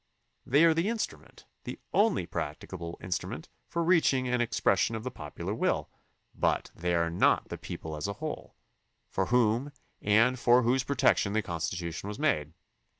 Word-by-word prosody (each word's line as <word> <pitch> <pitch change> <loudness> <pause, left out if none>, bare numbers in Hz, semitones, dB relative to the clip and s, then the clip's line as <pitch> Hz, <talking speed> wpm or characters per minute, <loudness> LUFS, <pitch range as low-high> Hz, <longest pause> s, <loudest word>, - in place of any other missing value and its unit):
They 145 +5 +5
are 165 -1 +6
the 165 +4 0
instru 225 0 -2
ment, - - -19 0.2
the - - -6 0.2
only 205 - +3
practicable 85 -1 -5
instrument, 90 -2 -4 0.2
for 170 - -1
reaching 160 -7 +3
an 125 0 +1
expression 115 -2 +1
of 110 - -5
the 130 - -4
popular 75 -7 -6
will; - - 0 0.4
but - - 0
they 85 +1 0
are 85 0 +1
not 85 - +2
the - - -5
people 80 -1 -6
as 75 - -3
a 100 - -2
whole, 155 +6 -6 0.6
for - - 0
whom 120 +3 +2 0.3
and 115 +5 +3
for 125 +1 +5
whose 125 +3 +2
protection 130 -7 +2
the 110 0 +1
Constitution 85 +1 -4
was 105 - -5
made. 80 - 0
115 Hz, 165 wpm, -29 LUFS, 90-140 Hz, 0.6 s, are